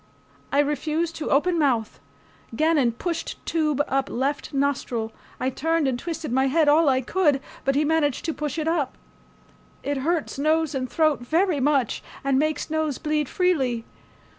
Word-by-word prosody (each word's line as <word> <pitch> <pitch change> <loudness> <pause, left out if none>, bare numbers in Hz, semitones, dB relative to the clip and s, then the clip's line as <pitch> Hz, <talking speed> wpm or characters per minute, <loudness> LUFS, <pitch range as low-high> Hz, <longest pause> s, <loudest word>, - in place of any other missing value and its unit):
I - - +1
refused 310 +3 -1
to 310 - -3
open 340 +5 +2
mouth. 245 -7 +1 0.6
Gannon 295 -4 +3
pushed 330 +7 -4
tube 305 -3 +1
up 270 0 0
left 275 +5 -2
nostril. 255 -5 -1 0.3
I 260 +1 0
turned 325 +2 0
and 250 -2 -1
twisted 325 -3 -4
my 265 +2 +3
head 305 +3 +3
all 300 +1 +5
I 260 -1 +2
could, 295 0 +2 0.3
but 275 0 +2
he 295 +2 +2
managed 295 -3 +1
to 325 - -1
push 300 0 -4
it 315 -1 -1
up. 315 -6 0 0.9
It 285 0 -1
hurts 310 +1 -1
nose 310 +1 +2
and 255 -2 -2
throat 310 0 +2
very 320 +6 +1
much 270 -3 +1 0.2
and 275 -1 +2
makes 310 +1 -1
nose 315 -3 0
bleed 300 -3 -1
freely. 265 -11 +1
295 Hz, 165 wpm, -24 LUFS, 265-320 Hz, 0.9 s, all